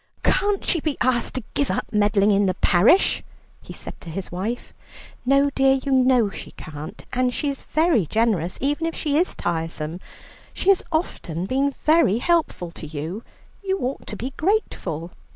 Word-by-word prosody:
"Can't 405 0 +1
she 340 - +1
be 305 -2 -2
asked 250 -2 +1
to 255 - -2
give 285 - 0
up - - -1
meddling 205 -1 +3
in 200 0 +3
the 185 - 0
parish?" 195 - +4 0.4
he - - -11
said - - -8
to 170 - -9
his 180 +3 -5
wife. 205 +7 -4 0.5
"No 275 +1 +4
dear, 270 0 +4
you 270 +1 -3
know 255 -5 +4
she - - -8
can't, 150 0 -8
and 255 0 +2
she 285 +3 -1
is 275 - -4
very 310 - +2
generous, 205 -4 +1
even 290 +4 0
if 330 - -4
she 295 -3 -1
is 345 +4 +1
tiresome. 165 -1 -3 0.6
She 385 - 0
has 390 - +5
often 180 - -2
been 275 +5 0
very 305 - +5
helpful 310 - 0
to 160 - -9
you. 160 +8 -5 0.4
You 385 0 0
ought 260 -5 -4
to - - -4
be 255 +5 -5
grateful." 180 - -1
245 Hz, 175 wpm, -23 LUFS, 185-290 Hz, 0.6 s, has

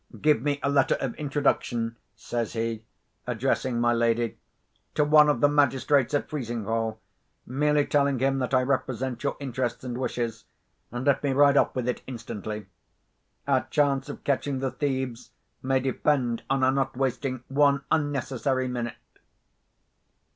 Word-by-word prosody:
Give 150 -6 +3
me 145 +1 0
a - - +2
letter 140 -1 +3
of 130 -3 -2
introduction," 135 -5 0 0.2
says 120 -2 -3
he, 115 -1 -2 0.4
addressing 125 0 0
my 120 0 +3
lady, 115 -1 +1 0.6
"to 150 - +4
one 150 0 +6
of 135 -5 +1
the 145 - +7
magistrates 140 -1 +2
at 145 - 0
Frizinghall—merely 120 +4 -2
telling 140 -2 +2
him 135 +2 +1
that 125 - -2
I 130 -1 +3
represent 130 -1 -1
your 140 - -1
interests 130 -3 -3
and 125 -2 -4
wishes, 120 -3 -3 0.5
and 120 +2 -4
let 140 -2 +3
me 140 -2 0
ride 140 +1 +5
off - - +3
with 125 -2 -2
it 125 - -1
instantly. 110 -4 -6 0.8
Our 135 -2 +2
chance 140 -2 +1
of 145 - -8
catching 140 0 0
the 130 0 -2
thieves 130 -4 -3 0.3
may 130 0 +1
depend 130 -2 0
on 135 -1 +1
our 130 - +5
not 135 -2 -1
wasting 130 -1 -1
one 140 0 +3
unnecessary 135 -3 0
minute." 120 -2 -3
130 Hz, 145 wpm, -26 LUFS, 120-140 Hz, 0.8 s, the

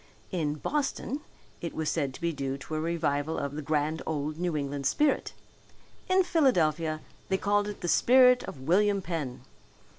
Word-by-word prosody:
In 155 -6 -1
Boston 285 - -2 0.4
it 170 - -5
was 160 -1 -2
said 145 -5 0
to - - -11
be 170 0 0
due 135 -2 -3
to 145 +3 -9
a 155 - 0
revival 160 -2 -1
of 140 0 -3
the 155 - -3
grand 155 +1 0
old 155 0 -2
New 175 -3 0
England 140 -1 -2
spirit. 300 -1 +1 0.8
In 375 0 +5
Philadelphia 165 - +2 0.3
they 190 - +2
called 205 +1 +1
it 210 - -6
the - - -2
spirit 250 +5 +6
of 135 - -8
William 195 +6 +2
Penn. 150 -9 -4
160 Hz, 170 wpm, -29 LUFS, 150-205 Hz, 0.8 s, spirit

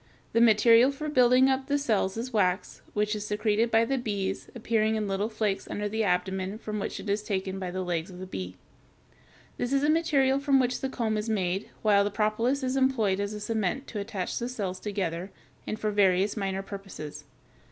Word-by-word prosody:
The 230 - +4
material 230 +3 +6
for 300 +2 -5
building 255 -1 +5
up 265 0 0
the 285 - +2
cells 220 -7 0
is 245 +2 -4
wax, 185 -3 0
which 210 +1 0
is 210 - -4
secreted 215 +2 +1
by 225 0 +4
the 270 +2 0
bees, 200 -4 -3
appearing 220 -1 +1
in 215 -1 -1
little 200 +2 -1
flakes 215 -3 -2
under 210 0 -2
the 220 +2 -1
abdomen, 190 +1 -1
from 215 -1 -4
which - - -4
it - - -8
is 205 +1 0
taken 190 -2 -3
by 185 -1 -3
the 185 +1 -3
legs 170 -1 -2
of 180 - -10
the 185 - -6
bee. 90 - -6 1.0
This 245 - -2
is 275 0 +2
the 300 - +4
material 280 -5 +2
from 280 -1 +3
which 250 -1 0
the 265 - -1
comb 225 -4 -1
is 215 +2 -4
made, 190 -2 -1
while 205 -2 +5
the 205 - 0
propolis 225 +6 0
is 255 0 -1
employed 240 -8 +2
as 200 +1 -2
a - - -5
cement 220 +4 -1
to 215 - -4
attach 200 -3 -3
the 240 +1 -3
cells 195 -7 -4
together, 185 -3 -3 0.4
and 215 - -3
for 215 - -1
various 195 -1 +3
minor 195 -2 -2
purposes. 180 -7 -8
210 Hz, 205 wpm, -28 LUFS, 195-240 Hz, 1.0 s, material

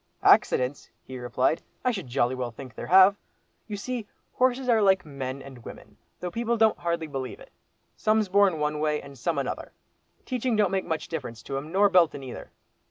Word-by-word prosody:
"Accidents!" 130 +2 +3
he 130 -1 -8
replied, 125 +5 0 0.2
"I 250 - +4
should 195 - -5
jolly 125 0 +1
well 125 -2 -3
think 125 +1 -11
there - - -7
have. 190 +2 +7 0.5
You 210 -2 -4
see, 235 +1 -4 0.3
horses 255 0 +1
are 230 -3 +4
like 190 -3 +3
men 135 -2 -5
and 130 -4 -12
women, - - -11 0.2
though 180 - -4
people 235 +2 -1
don't 220 -1 +3
hardly 170 -1 -1
believe 135 -4 -5
it. - - -15 0.4
Some's 215 -1 +2
born 195 -2 +4
one 150 0 -1
way, 150 0 +1
and 140 0 -12
some 150 +5 -2
another; 135 -2 -4 0.5
teaching 250 -2 -1
don't 210 -3 +2
make 190 -1 -1
much 160 -1 -3
difference 125 -8 -6
to 135 - -5
'em, 150 +3 -6
nor 200 +3 +5
beltin' 175 -7 +3
either. 130 - -8
165 Hz, 190 wpm, -26 LUFS, 135-205 Hz, 0.5 s, have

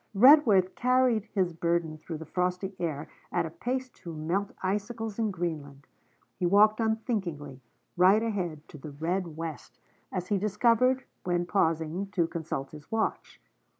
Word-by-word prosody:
Redworth 215 -6 +6
carried 250 -3 +2
his 190 -5 -1
burden 165 -1 -1
through 160 0 -6
the 160 - -8
frosty 180 +3 -2
air 155 -3 -3 0.2
at 175 -2 +1
a 160 - -6
pace 255 +10 -3
to 170 - -10
melt 175 +6 -1
icicles 210 +3 -2
in 220 -1 +1
Greenland. 155 -7 -5 0.5
He 180 - +2
walked 215 +4 +5
unthinkingly, 190 - -2 0.3
right 190 +5 +5
ahead, 175 -9 -3
to 150 - -11
the 150 - -8
red 165 +3 -3
West, 165 -2 -7 0.3
as 180 -1 -4
he 205 -2 +2
discovered 235 +5 +2 0.2
when 175 -1 0
pausing 165 0 0
to 170 -3 +2
consult 160 -5 -4
his 150 -1 -13
watch. 225 0 -2
180 Hz, 150 wpm, -28 LUFS, 160-215 Hz, 0.5 s, Redworth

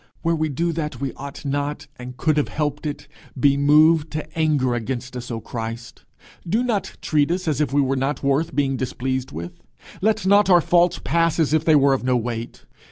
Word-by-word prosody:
Where 165 0 +2
we 155 -1 -1
do 170 +5 -1
that 150 -6 -4
we 135 -1 -3
ought 140 +1 -9
not, 145 +1 -2
and 125 0 -9
could 155 +2 +1
have 150 - +2
helped 150 0 -3
it, 145 - -6 0.3
be 140 +2 +4
moved 150 +2 +4
to 155 - -6
anger 150 -6 +1
against 125 +2 -4
us, 125 -1 -6
O 115 -2 -3
Christ! 115 +1 -7 0.4
do 220 +7 +2
not 225 -5 -2
treat 150 -1 +2
us 180 +1 -2
as 150 -2 0
if 150 - 0
we 145 +1 +3
were 135 0 0
not 135 +3 -2
worth 140 +1 0
being 135 -1 +1
displeased 130 +1 -3
with; 85 +3 -8 0.4
let 215 -1 +1
not 200 +1 +4
our 175 -2 +7
faults 175 +1 +2
pass 165 -1 +1
as 155 -2 +2
if 155 -1 +2
they 160 - +5
were 140 -1 +5
of 135 - -1
no 125 0 +2
weight. 115 0 -5
145 Hz, 210 wpm, -22 LUFS, 130-160 Hz, 0.4 s, our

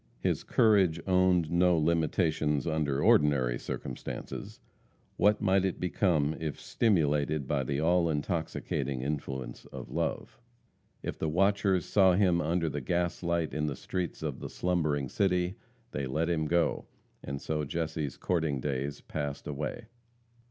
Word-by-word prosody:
His - - 0
courage 95 -7 +3
owned 90 -3 +3
no 90 0 +4
limitations 80 -2 +1
under 75 -4 0
ordinary 65 -5 +4
circumstances. 65 - -6 0.6
What 105 +1 +3
might 95 -2 +3
it 95 -2 -1
become 85 -5 +1
if 75 -3 -4
stimulated 75 - +1
by 70 -1 0
the 70 +2 -1
all 85 +1 +3
intoxicating 75 -4 -2
influence 65 -4 -4
of - - -9
love? - - -3 0.6
If - - -4
the 80 - 0
watchers 95 0 +2
saw 95 -3 +5
him 90 -2 +3
under 85 +1 0
the 75 -1 -3
gaslight 85 +1 -1
in 75 0 -1
the 70 - -2
streets 90 -3 -4
of - - -3
the - - -6
slumbering 75 -6 0
city, 90 +3 +1 0.4
they 70 -2 -3
let 80 +6 0
him 80 -2 0
go, 85 +1 +1 0.4
and 70 0 -4
so 75 +1 -2
Jesse's 80 -2 -3
courting 80 -6 0
days 70 +1 -3
passed 70 -2 -4
away. 75 - -4
80 Hz, 140 wpm, -30 LUFS, 75-90 Hz, 0.6 s, saw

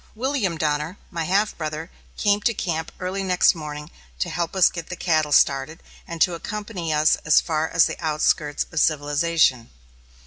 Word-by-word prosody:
William 235 - -1
Donner, 150 +4 -1
my 165 -3 -3
half 200 +5 +1
brother, 155 +1 -5 0.3
came 205 -1 +2
to 230 +1 +1
camp 160 -3 -3
early 185 +2 -3
next 185 -2 +3
morning 150 -2 -8 0.3
to 65 - -2
help 170 +1 -3
us 185 -2 +5
to - - +3
get 170 -2 -7
the 180 - -4
cattle 155 -4 0
started, 135 +2 +2 0.2
and 170 0 -7
to 180 - 0
accompany 195 -1 -5
us 150 0 +3
as 150 - +4
far 155 -1 -1
as 165 -1 +4
the - - -5
outskirts 150 -1 0
of 160 - -1
civilization. 145 -4 +1
165 Hz, 175 wpm, -23 LUFS, 150-185 Hz, 0.3 s, us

